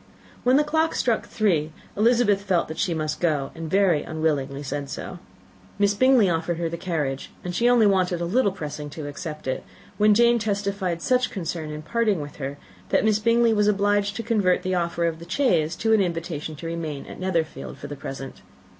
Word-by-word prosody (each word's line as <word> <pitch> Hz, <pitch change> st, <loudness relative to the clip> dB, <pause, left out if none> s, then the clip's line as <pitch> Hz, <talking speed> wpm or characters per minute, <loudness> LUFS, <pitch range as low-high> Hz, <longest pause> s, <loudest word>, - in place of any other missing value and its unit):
When 255 Hz, +2 st, +5 dB
the 300 Hz, -, +4 dB
clock 315 Hz, +2 st, +1 dB
struck 235 Hz, -3 st, 0 dB
three, 165 Hz, -8 st, +1 dB, 0.2 s
Elizabeth 220 Hz, -2 st, +3 dB
felt 190 Hz, -4 st, +1 dB
that 160 Hz, -, -6 dB
she 175 Hz, -4 st, 0 dB
must 155 Hz, -1 st, -2 dB
go, 150 Hz, -5 st, 0 dB
and 165 Hz, -1 st, -6 dB
very 190 Hz, -4 st, +3 dB
unwillingly 145 Hz, -3 st, -2 dB
said 140 Hz, 0 st, -4 dB
so. -, -, -6 dB, 0.6 s
Miss 200 Hz, 0 st, +3 dB
Bingley 255 Hz, -1 st, +5 dB
offered 170 Hz, 0 st, -1 dB
her 170 Hz, -1 st, -1 dB
the 170 Hz, -, -4 dB
carriage, 155 Hz, -6 st, -3 dB
and 180 Hz, -, -4 dB
she 235 Hz, +7 st, +3 dB
only 240 Hz, -3 st, +5 dB
wanted 185 Hz, -3 st, +2 dB
a 170 Hz, -, -1 dB
little 205 Hz, +3 st, +2 dB
pressing 150 Hz, -4 st, -6 dB
to 150 Hz, +1 st, -7 dB
accept 155 Hz, 0 st, -7 dB
it, 130 Hz, -, -2 dB, 0.4 s
when 210 Hz, 0 st, +5 dB
Jane 235 Hz, +1 st, +5 dB
testified 200 Hz, -5 st, -2 dB
such 255 Hz, 0 st, +2 dB
concern 165 Hz, -4 st, -4 dB
at 150 Hz, 0 st, -7 dB
parting 220 Hz, -3 st, +1 dB
with 145 Hz, -1 st, -7 dB
her 140 Hz, 0 st, -5 dB, 0.3 s
that -, -, +2 dB
Miss 215 Hz, -1 st, +3 dB
Bingley 230 Hz, +1 st, +3 dB
was 210 Hz, -1 st, +2 dB
obliged 205 Hz, 0 st, +2 dB
to 230 Hz, -, -4 dB
convert 205 Hz, -6 st, +2 dB
the 185 Hz, -, -1 dB
offer 170 Hz, -1 st, 0 dB
of 165 Hz, -1 st, -1 dB
the 170 Hz, +1 st, -11 dB
chaise 175 Hz, -, +2 dB
into 225 Hz, 0 st, +1 dB
an 215 Hz, -, +5 dB
invitation 165 Hz, -3 st, -3 dB
to 160 Hz, -, -9 dB
remain 165 Hz, -4 st, -4 dB
at -, -, -10 dB
Netherfield 170 Hz, -4 st, -2 dB
for -, -, -9 dB
the 145 Hz, 0 st, -6 dB
present. 135 Hz, -1 st, -7 dB
180 Hz, 200 wpm, -24 LUFS, 155-210 Hz, 0.6 s, When